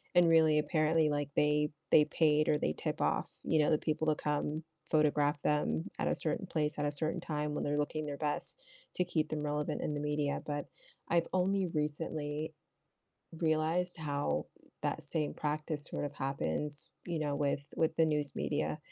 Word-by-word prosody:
And 175 -1 +6
really 160 -2 +5
apparently, 155 0 +2
like, 145 -1 -1
they 150 0 +3 0.2
they 150 - +7
paid 155 0 +3
or 150 - +4
they 75 - 0
tip - - -3
off, - - +1
you 160 - +2
know, 150 - +4
the 155 - +5
people 155 0 -1
to 155 - +4
come 150 +1 -1 0.3
photograph 150 -1 +3
them 80 - +1
at - - +1
a - - +2
certain - - 0
place 150 -1 -1
at 145 - 0
a 145 - +1
certain 155 +2 0
time 150 -1 -2
when - - -1
they're 145 +1 0
looking 155 +1 -1
their 145 -1 -4
best 150 - -3 0.3
to 180 - +2
keep 155 -3 -1
them 155 -1 -2
relevant 150 0 -1
in 150 - -1
the 145 - -2
media, 150 -1 -1
but, 145 -1 -3 0.4
I've 170 0 +3
only 185 0 +2
recently 150 0 -2 0.8
realized 165 +2 +1
how 145 - -1 0.3
that - - -1
same 155 -3 -1
practice 150 0 -2
sorta 145 - -3
happens, 135 - -2 0.2
you 170 -2 -2
know, 145 -2 -1
with 140 -1 +1 0.2
with 160 0 +2
the 160 - +4
news 150 -3 0
media. 150 +1 -1
150 Hz, 180 wpm, -33 LUFS, 145-160 Hz, 0.8 s, they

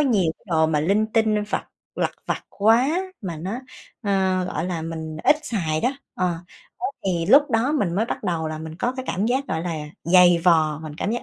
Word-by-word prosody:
nhiều 205 - +2
cái - - -30
đồ 160 -1 +3
mà 150 -2 +1
linh 200 +7 +2
tinh 220 -1 +2
vặt - - -2 0.3
lặt - - 0 0.2
vặt - - -2
quá 240 - +3 0.2
mà 175 -5 -5
nó, 190 +9 -4 0.4
ơ, 190 -3 +1
gọi 180 -2 -3
là, 175 -3 -3
mình 160 -1 -5
ít 300 - +6
xài 170 - -1
đó, - - +2 0.3
ờ, 185 - 0 0.5
đó 370 - -1 0.2
thì 170 -3 0
lúc 290 +1 +6
đó 230 +5 +2
mình 200 - 0
mới 215 - +2
bắt - - -4
đầu 165 -4 -1
là 155 0 -5
mình 160 0 -7
có 245 +6 -1
cái 260 - -4
cảm 200 +5 0
giác, 265 +3 0
gọi 160 - -1
là, 165 -4 -3 0.2
dày 175 0 +6
vò, 155 -4 +4
mình 155 -2 -7
cảm 200 - -2
giác 240 - -2
185 Hz, 220 wpm, -23 LUFS, 160-225 Hz, 0.5 s, ít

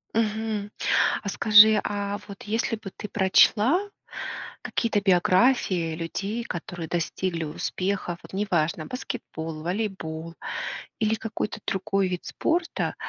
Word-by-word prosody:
Мгм, 215 -2 -1 0.5
а - - -5
скажи, 215 0 +7
а 205 0 -2
вот 200 - -9
если 225 +2 -1
бы 215 -2 -8
ты 210 - -7
прочла 210 - +4 0.8
какие-то 225 -3 0
биографии 185 -2 +3
людей, 195 +7 -3
которые 175 -2 -5
достигли 170 +1 -2
успехов, 180 +3 -2
вот - - -12
неважно 170 -5 0
баскетбол, 165 -11 -5
волейбол 170 -4 -3 0.7
или 220 -1 +2
какой-то 220 -1 -4
другой 195 0 +1
вид 180 -1 -3
спорта, 340 +1 -1
200 Hz, 110 wpm, -26 LUFS, 175-220 Hz, 0.8 s, скажи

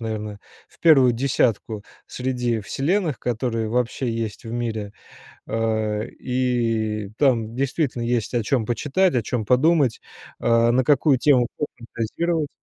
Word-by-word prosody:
наверное, 105 -2 -4 0.3
в - - -25
1 135 -7 +6
десятку 115 -4 0 0.2
среди 125 -3 -2
вселенных, 150 - -1
которые 115 -2 -2
вообще 125 +1 -1
есть 115 -1 -4
в 115 - -7
мире, 110 -4 -3 0.5
а, 110 -2 -1
и 115 -4 -1
там 115 -6 +2
действительно 135 -1 -1
есть 120 -1 -1
о 120 - +2
чём 115 0 0
почитать, 150 - +1
о 120 - +2
чём 110 +2 -2
подумать, 135 +1 +3 0.4
а, 115 0 +3
на 130 +2 +3
какую 140 0 +3
тему 125 -3 +4
пофантазировать. 145 +5 -3
120 Hz, 130 wpm, -23 LUFS, 110-135 Hz, 0.5 s, 1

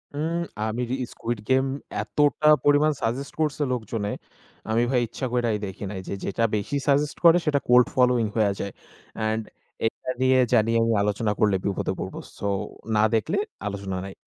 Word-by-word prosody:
উম, 165 +3 -1 0.3
আমি 115 +3 -2
রি 130 - +1 0.2
'Squid 115 -1 -4
Game' 130 +1 +3 0.3
এতটা 145 0 +1 0.2
পরিমাণ 145 +1 +5
সাজেস্ট 125 +5 -2
করছে 150 -1 0
লোকজনে, 110 -3 -3 0.6
আমি 115 +2 +3
ভাই 130 - +3
ইচ্ছা 130 - -5
কইরাই 120 -3 +1
দেখি 95 +1 -7
নাই। 100 - -5
যে - - -3
যেটা 115 +4 -1
বেশি 105 +7 -2
সাজেস্ট 145 +1 +2
করে, 170 +1 +8
সেটা 145 -2 +2
cold 125 0 +6
following 125 -3 +3
হইয়া 105 -3 +3
যায়। 100 - -4 0.4
অ্যান্ড 110 0 0 0.4
এটা 115 - -3
নিয়ে 130 0 +4
জানি 115 -1 +4
আমি 115 0 +2
আলোচনা 105 +1 0
করলে 105 -2 +3
বিপদে 100 - -1
পড়বো। - - -5 0.2
সো, - - -5 0.5
না 105 - +4
দেখলে 110 - 0 0.3
আলোচনা 100 -2 -4
নাই। 95 - -8
115 Hz, 170 wpm, -25 LUFS, 105-135 Hz, 0.6 s, করে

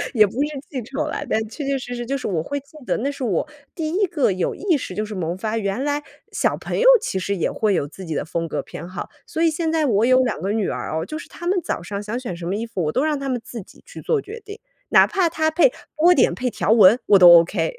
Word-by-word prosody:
也 215 -2 +7
不 200 - -7
是 295 - +1 0.2
记 260 -4 -5
仇 275 +6 -4
啦， 300 - -3
但 - - +2
确 285 +7 -7
确 275 0 0
实 245 -1 -6
实 240 0 -5
就 275 +3 -2
是 265 - -5
我 175 -6 -1
会 285 - -4
记 280 +3 -24
得， - - +1
那 275 +5 -1
是 280 - -7
我 215 - 0 0.3
第 320 -2 -3
1 385 +5 +1
个 300 - +1
有 185 -1 -2
意 375 -4 +1
识 190 -8 -7
就 215 - -2
是 210 - -7
萌 175 -2 -3
发， 220 +3 -2
原 200 +4 -2
来 290 0 -1 0.3
小 - - 0
朋 - - -4
友 - - +4
其 190 - -3
实 200 +2 -2
也 170 - -1
会 210 -3 +1
有 145 - -1
自 175 +6 -11
己 160 -2 -4
的 145 - -2
风 165 +1 -3
格 150 -3 -3
偏 170 - -9
好。 185 -1 -6 0.2
所 320 - -3
以 330 - +5
现 320 +1 -1
在 320 -1 +1
我 220 -4 +2
有 255 +1 +5
2 245 - -2
个 195 - -1
女 215 -2 0
儿 - - -4
哦， 160 +1 -2
就 310 - -6
是 - - -10
她 345 - -10
们 365 +1 +1
早 230 - -3
上 200 +3 -5
想 215 +4 -4
选 240 -9 -5
什 170 0 -7
么 190 - -1
衣 225 +3 -3
服， 210 -6 -4
我 150 - 0
都 260 - 0
让 305 -2 0
她 275 0 -4
们 250 -2 -1
自 235 - -7
己 - - -18
去 - - -10
做 460 - +1
决 440 +3 -9
定， 415 +2 -10 0.3
哪 - - +7
怕 375 -4 +1
她 315 0 0
配 350 +10 +4 0.2
波 335 +3 +5
点 - - +3
配 250 0 -2
条 220 - -1
纹， 220 +1 +7
我 200 - +6
都 180 -1 +9
OK。 165 -1 -2
240 Hz, 310 characters per minute, -21 LUFS, 190-305 Hz, 0.3 s, 都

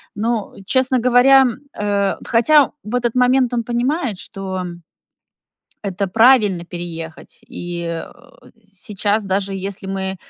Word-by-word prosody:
Но, 220 0 -2
честно 260 +1 +2
говоря, 250 +3 +6
м, 245 -4 -1
а, 200 -1 0
хотя 275 +5 +4
в 215 +3 -4
этот 240 -1 0
момент 250 0 +3
он 235 - 0
понимает, 240 - -1
что 190 -1 -5 1.2
это 200 -1 -2
правильно- 215 -5 +4
переехать. 170 -2 -8
И, 175 -8 -6
э, 165 -1 -5 0.5
сейчас, 205 +1 -2
даже 195 0 -1
если 195 +1 -6
мы, 190 0 -3
205 Hz, 120 wpm, -19 LUFS, 190-245 Hz, 1.2 s, говоря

